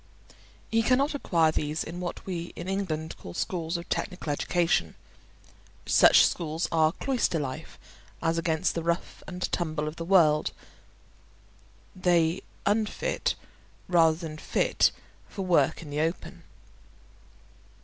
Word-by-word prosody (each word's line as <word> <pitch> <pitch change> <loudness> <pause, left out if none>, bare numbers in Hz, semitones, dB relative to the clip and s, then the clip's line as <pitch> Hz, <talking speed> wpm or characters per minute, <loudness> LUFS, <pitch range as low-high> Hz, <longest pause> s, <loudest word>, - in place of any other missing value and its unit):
He 225 0 +3
cannot 260 +6 +2
acquire 165 - +2
these 150 0 -2
in 170 +2 -7
what 180 -1 -5
we 175 -2 -5
in 170 - -7
England 175 -5 -2
call 85 - -9
schools 170 -1 -2
of 170 - -8
technical 180 -5 -3
education; 165 - 0 0.9
such - - +7
schools 165 0 -1
are 160 -1 +4
cloister 255 -10 0
life 135 -4 -5 0.4
as 165 +1 0
against 165 +1 0
the 170 - -2
rough 170 +2 -2
and 180 -1 -5
tumble 155 -3 -1
of 155 - -6
the 165 - -4
world; 165 -4 +4 1.4
they 175 -1 +2 0.2
unfit, 215 - 0 0.5
rather 165 -3 +4
than 160 -2 -7
fit - - +2 0.4
for 195 -2 -5
work 170 -4 +2
in 150 - -10
the 150 +1 -1
open. 165 +3 -3
170 Hz, 130 wpm, -27 LUFS, 155-185 Hz, 1.4 s, such